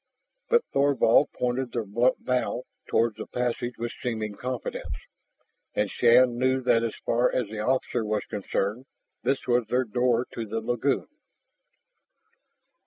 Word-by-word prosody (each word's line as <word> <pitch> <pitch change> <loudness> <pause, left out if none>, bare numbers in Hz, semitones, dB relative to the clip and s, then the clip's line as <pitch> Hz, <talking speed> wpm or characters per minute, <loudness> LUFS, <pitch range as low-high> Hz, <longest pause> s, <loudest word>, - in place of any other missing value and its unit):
But 475 0 +4
Thorvald 140 -2 +4
pointed 125 0 -2
their 115 -3 -1
blunt 120 +6 +1
bow 125 0 0 0.2
toward 115 -1 +2
the - - -6
passage 120 0 -2
with 120 0 -3
seeming 110 -4 -2
confidence, 125 +3 -4 0.8
and 105 -1 0
Shann 120 0 +5
knew 130 +1 +2
that 120 -2 +3
as 115 -1 -2
far 120 +2 +2
as 120 -5 -1
the 110 0 -6
officer 125 0 0
was 105 -1 -1
concerned, 105 +3 -2 0.3
this 135 +2 0
was 120 -2 +2
their 125 +3 +2
door 120 +2 +1
to 115 -1 -4
the 110 +2 -2
lagoon. 120 +4 0
120 Hz, 140 wpm, -27 LUFS, 115-125 Hz, 0.8 s, Shann